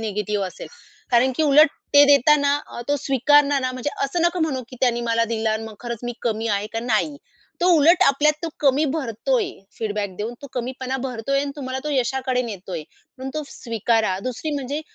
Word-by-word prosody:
Negative 210 -2 -2
असेल. 185 - -9 0.4
कारण 250 +2 +4
की - - +1
उलट 300 +1 +6 0.3
ते 285 0 +9
देताना 285 +1 +3
अ, - - -8
तो 290 - +2
स्वीकारणार 285 +1 +4
ना, 255 -1 -2
म्हणजे 255 +3 -3
असं 305 +5 -1
नको 345 +1 -1
म्हणू 275 -5 -1
की 255 - -10
त्यांनी 240 -2 +2
मला 230 0 +2
दिलं 220 0 0
आणि 220 +1 -2
मग 220 -1 -9
खरंच 235 -1 -5
मी 240 - -3
कमी 225 -1 -1
आहे 205 -1 0
का 225 - -1
नाही. 240 +5 0 0.4
तो 350 - +2
उलट 325 +4 +5
आपल्यात 290 +2 +4
तो 335 - -2
कमी 280 +1 +3
भरतोय 320 - -1 0.3
फीडबॅक 205 -3 -3
देऊन 220 +4 -4
तो - - -6
कमीपणा 255 +1 -3
भरतोय 260 +2 -1
आणि 285 0 -3
तुम्हाला 260 -2 -4
तो 300 - -2
यशाकडे 260 -1 0
नेतोय, 190 -7 -6 0.4
म्हणून 265 +1 -5
तो 310 - -2
स्वीकारा. 225 -4 -1
दुसरी 255 +5 -3
म्हणजे 285 +1 -3
255 Hz, 195 wpm, -22 LUFS, 225-285 Hz, 0.4 s, ते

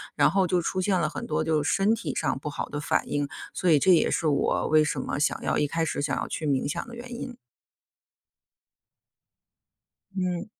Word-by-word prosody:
然 - - +5
后 195 -1 +3
就 180 0 +1
出 185 +2 -2
现 190 0 +2
了 155 -2 0
很 - - -6
多 155 0 -1
就 155 -1 +1
身 195 +8 +2
体 230 - -4
上 - - 0
不 150 - -5
好 - - -4
的 145 - -4
反 - - 0
应， 145 0 -1 0.3
所 180 - 0
以 150 - +6
这 190 - +4
也 165 - +4
是 165 - 0
我 145 -2 +1
为 155 0 +5
什 145 - -1
么 - - -3
想 145 - 0
要 - - 0
一 150 - +2
开 165 +3 -1
始 145 - -2
想 140 -1 0
要 - - -2
去 155 - -4
冥 140 -1 0
想 - - -3
的 240 - -9
原 245 +1 -9
因。 250 -2 -6 2.8
嗯。 180 -2 -1
160 Hz, 225 characters per minute, -26 LUFS, 150-185 Hz, 2.8 s, 以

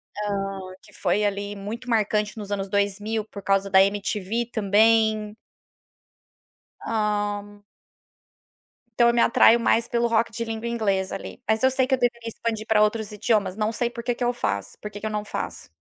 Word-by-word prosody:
Hã, 195 -2 -3 0.2
que - - -19
foi 210 - 0
ali 205 0 -2
muito 220 +5 -7
marcante 210 -1 +1
nos 205 -1 -7
anos 195 -1 -2
2000 205 +2 -1
por 205 -2 -10
causa 195 0 +1
da 190 0 +7
MTV 205 +3 -1
também. 215 0 +3 1.5
Hã. 205 -1 -2 1.4
Então, 235 - +7
eu - - +2
me 235 - +3
atraio 235 0 +6
mais 230 0 +2
pelo 235 0 +1
rock 230 0 +1
de 230 +1 -4
língua 225 +1 -4
inglesa 200 -5 -1
ali. 195 - -8
Mas 220 +3 +2
eu 260 - +5
sei 260 0 +1
que 265 - +3
eu - - -9
deveria 235 -1 -1
expandir 225 -1 -3
pra 215 -1 +4
outros 215 0 +1
idiomas, 210 -2 0
não 215 +1 0
sei 235 +1 -1
por 235 -1 -8
que 245 - 0
que 240 - -4
eu 245 - +2
faço, 100 - -3
por 210 - -7
que 205 - -8
que - - -7
eu - - 0
não 210 -1 -3
faço. - - -5
215 Hz, 185 wpm, -24 LUFS, 205-230 Hz, 1.5 s, da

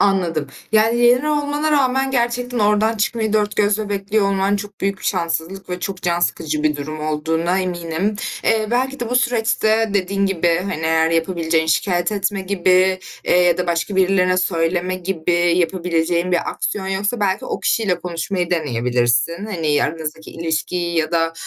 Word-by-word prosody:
Anladım. 175 -7 +1 0.3
Yani, 220 +2 +3
yeni 245 +4 +4
olmana 295 +1 0
rağmen 265 -1 +2
gerçekten 245 -1 -1
oradan 210 +1 +2
çıkmayı 220 0 -1
4 210 -1 +1
gözle 210 0 +1
bekliyor 200 +1 0
olman 195 +1 +1
çok 205 0 -8
büyük 195 0 -1
bir - - -13
şanssızlık 170 +3 -2
ve 180 0 -4
çok 190 -1 -5
can 175 0 0
sıkıcı 155 -3 -1
bir 150 -1 +1
durum 155 +2 -6
olduğuna 160 +4 0
eminim. 180 +2 -2 0.3
Eee, 220 -1 +2
belki 260 +2 -1
de, 240 -1 -3
bu 250 - +2
süreçte 225 -2 +1
dediğin 200 +1 +1
gibi, 175 -3 +1
hani, 155 - -3
eğer 160 0 +2
yapabileceğin 165 -1 0
şikâyet 175 +3 +1
etme 200 0 -1
gibi, 185 0 +2 0.3
eee, - - +3
ya 175 -1 +3
da 180 - -1
başka 170 +3 -1
birilerine 185 -1 +3
söyleme 180 0 0
gibi 180 -2 -2 0.2
yapabileceğin 175 0 0
bir 175 - +1
aksiyon 195 -2 -3
yoksa, 200 +4 -1
belki, 195 -2 0
o - - -4
kişiyle 195 -6 +1
konuşmayı 175 +1 -3
deneyebilirsin. 125 - 0
Hani, 160 -8 0
aranızdaki 160 0 -5
ilişkiyi 170 +1 -2
ya 155 +1 -1
da, 165 0 +1
185 Hz, 160 wpm, -20 LUFS, 165-210 Hz, 0.3 s, yeni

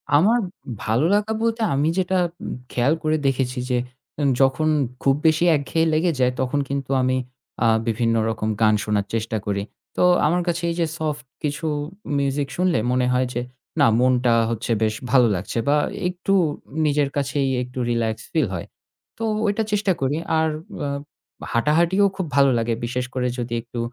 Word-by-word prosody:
আমার 210 +11 +5 0.4
ভালো 115 +7 +1
লাগা 210 +1 +1
বলতে, 230 0 0
আমি 145 +3 +2
যেটা 185 0 +1 0.3
উম - - -4 0.2
খেয়াল 125 +5 +2
করে 155 0 +2
দেখেছি 130 -1 0
যে 125 - +2 0.4
উম 145 -2 +2
যখন 135 +4 +3 0.4
খুব 135 -1 +4
বেশি 155 +1 +3
একঘেয়ে 160 +3 0
লেগে 165 +3 +2
যায়, 125 0 +3
তখন 130 +3 0
কিন্তু 140 -1 -3
আমি 130 0 +1 0.5
আ - - +5 0.2
বিভিন্ন 115 0 +1
রকম 110 -1 -2
গান 110 -1 +5
শোনার 105 -2 0
চেষ্টা 110 0 -1
করি। 100 -1 -1 0.3
তো - - +3 0.2
আমার 175 +4 +2
কাছে 170 0 -1
এই - - -3
যে 170 - +3
soft 150 -6 -3 0.2
কিছু 150 +2 -2 0.5
music 140 0 0
শুনলে 180 -8 +2
মনে 125 0 +2
হয় 125 0 +2
যে 120 - -1 0.4
না, - - +6
মনটা 125 -1 +3 0.2
হচ্ছে 115 +1 -3
বেশ 110 -1 +1 0.2
ভালো 125 -3 +6
লাগছে 90 +5 -4
বা 145 - +4 0.3
একটু 180 +2 -1 0.5
নিজের 145 -1 +2
কাছেই 140 0 0
একটু 125 +1 -7
relax 115 -2 0 0.2
feel - - +2
হয়। - - -4 0.5
তো 225 - -5 0.2
ওইটা 205 +1 +1
চেষ্টা 205 -2 +2
করি। 135 +3 0 0.2
আর 160 0 +2 0.4
অ - - -1 0.6
হাঁটাহাঁটিও 165 - +3
খুব 190 - -2
ভালো 140 -1 +6
লাগে। 115 0 0
বিশেষ 125 +1 -2
করে 125 -1 0
যদি 120 -1 -4
একটু 120 +1 -8
135 Hz, 170 wpm, -22 LUFS, 120-160 Hz, 0.6 s, না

